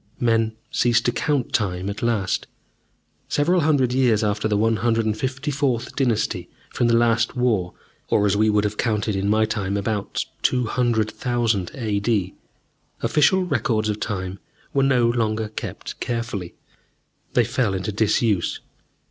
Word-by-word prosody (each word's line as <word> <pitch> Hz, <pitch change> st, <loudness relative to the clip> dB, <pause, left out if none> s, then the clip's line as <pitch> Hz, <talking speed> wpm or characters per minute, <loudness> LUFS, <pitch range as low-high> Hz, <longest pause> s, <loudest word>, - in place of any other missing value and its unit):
Men 115 Hz, -2 st, +1 dB, 0.2 s
ceased 120 Hz, -1 st, +2 dB
to 120 Hz, -, +3 dB
count 140 Hz, +1 st, -1 dB
time 95 Hz, -4 st, 0 dB
at 100 Hz, +1 st, -4 dB
last. 110 Hz, -5 st, 0 dB, 0.8 s
Several 175 Hz, +5 st, +2 dB
hundred 140 Hz, -5 st, +2 dB
years 120 Hz, -5 st, +3 dB
after 105 Hz, +1 st, 0 dB
the 105 Hz, -1 st, +1 dB
154th 120 Hz, +4 st, 0 dB
Dynasty 120 Hz, -6 st, 0 dB, 0.2 s
from 120 Hz, -, +1 dB
the 115 Hz, -, +4 dB
Last 115 Hz, +1 st, +2 dB
War, 110 Hz, -8 st, 0 dB, 0.3 s
or, 105 Hz, -, +3 dB
as 100 Hz, -1 st, +2 dB
we 110 Hz, +1 st, +3 dB
would 105 Hz, -1 st, +2 dB
have 105 Hz, 0 st, -2 dB
counted 105 Hz, -2 st, 0 dB
in 95 Hz, +1 st, 0 dB
my 110 Hz, +1 st, +3 dB
time, 100 Hz, -2 st, -2 dB
about 100 Hz, 0 st, -2 dB, 0.2 s
200,000 120 Hz, -3 st, 0 dB
A.D., 105 Hz, -5 st, 0 dB, 0.7 s
official 185 Hz, +5 st, +3 dB
records 115 Hz, -, 0 dB
of 105 Hz, 0 st, -2 dB
time 95 Hz, -3 st, -4 dB, 0.3 s
were 140 Hz, -, +3 dB
no 130 Hz, -3 st, +3 dB
longer 110 Hz, -2 st, 0 dB
kept 110 Hz, -, -7 dB
carefully. 115 Hz, -7 st, -4 dB, 0.8 s
They -, -, +4 dB
fell 110 Hz, -7 st, 0 dB
into 95 Hz, +3 st, -2 dB
disuse. 105 Hz, -2 st, +1 dB
110 Hz, 135 wpm, -23 LUFS, 105-120 Hz, 0.8 s, the